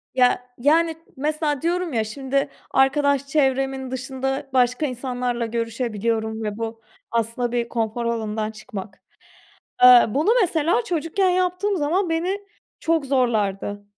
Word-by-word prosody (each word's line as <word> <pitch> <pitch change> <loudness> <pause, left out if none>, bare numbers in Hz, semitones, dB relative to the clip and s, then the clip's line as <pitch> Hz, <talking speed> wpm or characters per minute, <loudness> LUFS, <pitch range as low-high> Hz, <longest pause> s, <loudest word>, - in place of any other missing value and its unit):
ya, 250 -1 +3
yani 320 +5 +3 0.2
mesela 295 0 -1
diyorum 345 -1 -1
ya, 225 -2 +1
şimdi, 270 +5 -2 0.2
arkadaş 280 +1 +2
çevremin 270 -2 0
dışında 270 +2 -3
başka 250 +3 +2
insanlarla 245 -2 -2
görüşebiliyorum 225 -1 -2
ve 210 -1 -3
bu, 225 0 -5 0.3
aslında 230 +1 -1
bir 240 -1 -1
konfor 230 0 -2
alanından 220 -2 -2
çıkmak. 215 -3 -9 0.8
Eee, 250 -1 +9
bunu 295 - +1
mesela 345 +3 +2
çocukken 360 +1 0
yaptığım 365 +2 0
zaman, 345 +5 0
beni 355 +5 -1 0.4
çok 325 -3 +1
zorlardı. 210 -6 0
260 Hz, 120 wpm, -23 LUFS, 230-305 Hz, 0.8 s, Eee